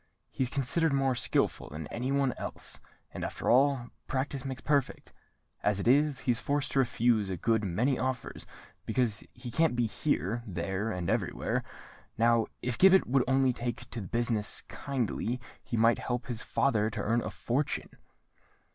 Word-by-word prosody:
He's 130 -2 -1
considered 140 +4 +1
more 135 -1 +2
skilful 125 - 0
than 75 +2 -6
any 125 +3 -2
one 140 -3 +2
else; - - -5 0.3
and, - - -5
after - - -1
all, 130 -1 +3 0.2
practice 135 0 -2
makes 130 -1 -5
perfect. 145 -3 0 0.5
As 105 -1 +1
it 100 - -2
is, 145 +2 +4
he 125 - +2
is 120 - 0
forced 145 +2 -1
to 140 - +2
refuse 115 -4 +2
a 95 - -2
good 110 +4 +1
many 120 +9 +1
offers, 130 -2 -3 0.4
because 115 -4 0
he 120 - -8
can't 160 0 +2
be 120 -1 +2
here, 110 0 -1
there, 95 +4 -2
and 90 -4 -3
everywhere. - - 0 0.5
Now 115 0 +4 0.2
if 125 -1 -2
Gibbet 190 0 +7
would 130 0 +3
only 130 -1 +3
take 120 0 -4
to 115 - -4
the 95 - -7
business 115 0 0
kindly, 125 -2 -2 0.2
he 120 - -3
might 115 +1 +4
help 120 0 -2
his 120 -2 -3
father 110 -6 +1
to - - -6
earn 115 +2 +2
a - - -3
fortune!" 135 +5 -2
120 Hz, 170 wpm, -30 LUFS, 115-135 Hz, 0.5 s, Gibbet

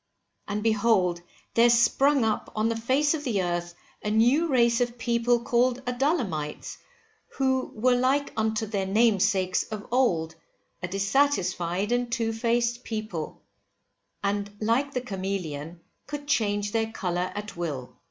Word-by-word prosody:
And 210 0 -3
behold 205 -6 +2 0.3
there 235 +1 +5
sprung 240 +3 +4
up 220 - -1
on 215 +1 +1
the 230 - -1
face 260 +7 +2
of 305 -2 -3
the 215 -9 0
earth 175 0 -3 0.3
a 210 - -2
new 240 +10 +3
race 235 -4 +3
of 240 0 -1
people 235 0 +1
called 250 +2 +1
Adullamites, 245 - -2 0.6
who 260 -1 +1
were 250 +3 +3
like 265 +3 +1
unto 220 0 0
their 200 -3 -2
namesakes 195 -3 +2
of 215 -1 -7
old, 170 -11 +1 0.5
a 180 - -2
dissatisfied 195 -3 0
and 245 0 0
two 230 -2 0
faced 235 +1 0
people, 215 -8 -5 0.8
and 200 0 -1
like 235 +6 +1
the 250 - 0
camelon 180 - -5 0.3
could 290 0 -6
change 205 -6 0
their 225 0 0
colour 180 -3 -2
at 205 0 -6
will. 150 -7 -5
225 Hz, 140 wpm, -26 LUFS, 195-245 Hz, 0.8 s, there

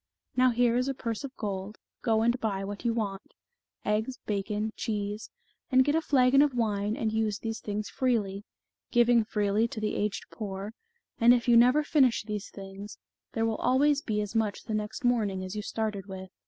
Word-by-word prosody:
Now 255 0 +5
here 240 0 +2
is 250 +1 +1
a 270 - -1
purse 230 -2 -4
of 275 -1 -8
gold, 200 0 -4 0.2
go 225 -2 +2
and 235 +2 +2
buy 200 -4 -1
what 205 +3 -6
you 235 - +2
want, 205 -4 -4 0.5
eggs, 220 +5 0
bacon, 210 +1 -2
cheese, 210 -1 -3 0.4
and 260 -1 +5
get 290 - +2
a 320 - +2
flagon 270 -2 +4
of 290 -3 +2
wine 210 -2 0
and 220 -1 -1
use 220 -2 0
these 225 0 -4
things 210 0 -4
freely, 210 -6 -1 0.5
giving 240 -1 +4
freely 210 0 +1
to 230 - -6
the 215 0 -1
aged 205 -1 -2
poor, 200 -1 -5 0.5
and 240 +2 +7
if 240 0 -2
you 240 - +6
never 250 +6 +6
finish 270 -7 +3
these 210 -1 -5
things, 195 +1 -9 0.4
there 225 0 +1
will 225 -1 0
always 285 +2 +3
be 210 -6 -1
as 210 0 -5
much 220 -3 0
the 220 - -5
next 215 +6 -3
morning 210 -6 +1
as 185 +2 -6
you 210 - -2
started 210 -2 -3
with. 190 -1 -8
220 Hz, 195 wpm, -29 LUFS, 205-245 Hz, 0.5 s, and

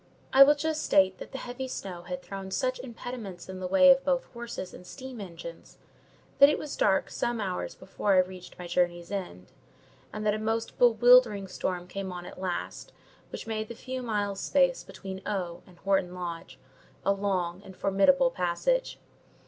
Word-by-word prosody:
I 270 - +7
will 290 +2 +9
just 315 +1 -1
state 190 -1 +3
that - - -9
the 270 - -5
heavy 255 +1 -5
snow 185 -8 -6
had 180 +1 -6
thrown 195 -1 -7
such 255 +6 -1
impediments 235 -7 -7
in 190 0 -7
the 185 - -3
way 275 +7 +7
of 270 0 +4
both 265 -2 +1
horses 235 -6 -6
and - - -11
steam 255 +3 -9
engines, 170 -3 -10 0.6
that 280 - +10
it 300 - +1
was 300 - -5
dark 190 - +2
some 240 -1 -1
hours 190 -4 -3
before 195 +1 0
I 185 - +7
reached 185 0 -9
my 180 - -7
journey's 175 0 0
end, 175 - -5 0.6
and 215 0 -5
that 210 - +3
a 215 - -2
most 225 +1 -2
bewildering 240 -3 +6
storm 180 -1 -3
came 195 0 -5
on 175 -1 -7
at 185 - -10
last, 180 -2 -4 0.4
which - - -6
made 220 -1 -3
the 235 - -8
few 255 +2 -5
miles' 205 -4 -1
space - - +2
between 190 -1 -8
O—— 180 -4 -3
and 180 -2 -18
Horton 190 -2 0
Lodge 170 -7 -6 0.5
a 200 - +4
long 190 -3 -1
and 190 -2 -12
formidable 255 +8 +4
passage. 185 - 0
195 Hz, 180 wpm, -28 LUFS, 180-245 Hz, 0.6 s, that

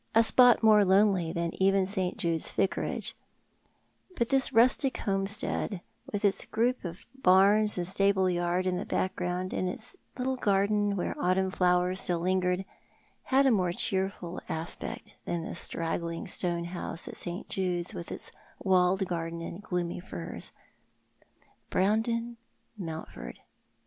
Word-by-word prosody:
'i^pot 230 +1 +6
more 215 -1 +7
lonely 190 -3 +3
than 170 -1 -2
even 195 0 +4
St. 190 -1 -2
Jude's 170 -6 -1
A^icarage; 195 - -1 1.0
but 235 -6 0
this 270 -1 +3
rustic 255 +3 +3
homestead, 195 0 -2 0.3
with 205 0 -1
its 200 - +3
group 240 +3 0
of 175 0 -7
barns 210 -2 +4
and 175 - -1
stable 195 0 +2
yard 175 +1 0
in 185 -1 0
the 185 - -4
background, 180 0 -2
and 185 - -1
its 220 +6 -8 0.2
little 260 0 -1
garden, 205 -1 +2
where 180 - -2
autumn 190 +1 +2
flowers 180 0 +2
still 175 -1 0
lingered, 180 +1 0 0.6
had 275 +1 +3
a 265 - +5
more 185 -5 +2
cheerful 190 -2 -2
aspect 160 +1 -5
than 170 -1 -2
the - - -5
straggling 165 0 -3
stone 175 -2 -1
house 175 -1 -5
at - - -7
St. 175 +1 -5
Jude's, 180 -1 -2
with 170 -3 -7
its - - -7 0.3
walled 190 0 +2
garden 165 -1 -3
and 170 +3 -7
gloomy 180 -5 -3
firs. 85 - -6 1.2
Brandon 230 +4 0 0.4
Mountford! 165 -6 -7
185 Hz, 135 wpm, -29 LUFS, 175-210 Hz, 1.2 s, more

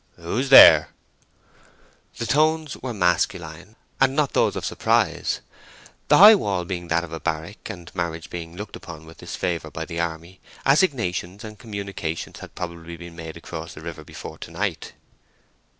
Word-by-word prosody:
"Who's 110 +11 -3
there?" 80 - +9 1.3
The 115 - -3
tones 155 +4 +1
were 130 - -6
masculine, 90 -1 -1 0.2
and 135 0 +3
not 150 -2 +1
those - - +2
of - - -4
surprise. - - 0 0.7
The - - +6
high 210 +3 +11
wall 100 - 0
being 90 -1 -5
that 85 +1 +1
of 85 -2 -9
a 80 - -4
barrack, 80 +7 -4
and 90 -5 -9
marriage 85 -2 -4
being 85 -1 -7
looked 105 +3 -7
upon 80 -2 -10
with 80 +1 -15
disfavour 85 -4 -3
in 80 - -3
the 85 -1 -5
army, 85 +2 -4 0.3
assignations 115 - +1
and 110 -2 -10
communications 100 -6 -5
had - - -12
probably 85 -1 -7
been 85 -1 -11
made 80 -1 -8
across 80 0 -8
the 75 - -10
river 80 -1 -7
before 80 +1 -10
to - - -8
night. 85 +1 -3
85 Hz, 160 wpm, -23 LUFS, 80-105 Hz, 1.3 s, high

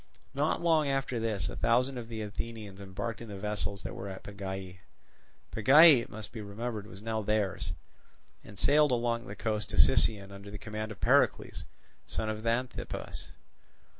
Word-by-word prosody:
Not 145 +3 +1
long 160 -3 +4
after 135 -3 0
this 110 -3 -1
a - - -5
thousand 125 +2 +2
of 115 - -7
the 110 -2 -4
Athenians 105 -2 -6
embarked 100 +4 -5
in 115 - -7
the 100 - -6
vessels 105 -1 -2
that 95 - -5
were 95 +2 -6
at 95 - -8
Pegae 95 -2 -6 0.7
(Pegae, 140 +5 +8
it - - -9
must 110 0 -7
be 115 - -6
remembered, 105 +1 -5
was 100 -1 -11
now 110 -1 -1
theirs), 100 -4 -1 0.7
and 100 - -13
sailed 150 +7 +4
along 120 0 0
the - - -7
coast 110 -2 -2
to - - -5
Sicyon 100 +9 +4
under 100 +1 -10
the 105 - -7
command 110 +1 -5
of 105 - -9
Pericles, - - +2 0.4
son 110 - -3
of 110 0 -3
Xanthippus. 120 +3 -3
110 Hz, 170 wpm, -31 LUFS, 100-120 Hz, 0.7 s, Pegae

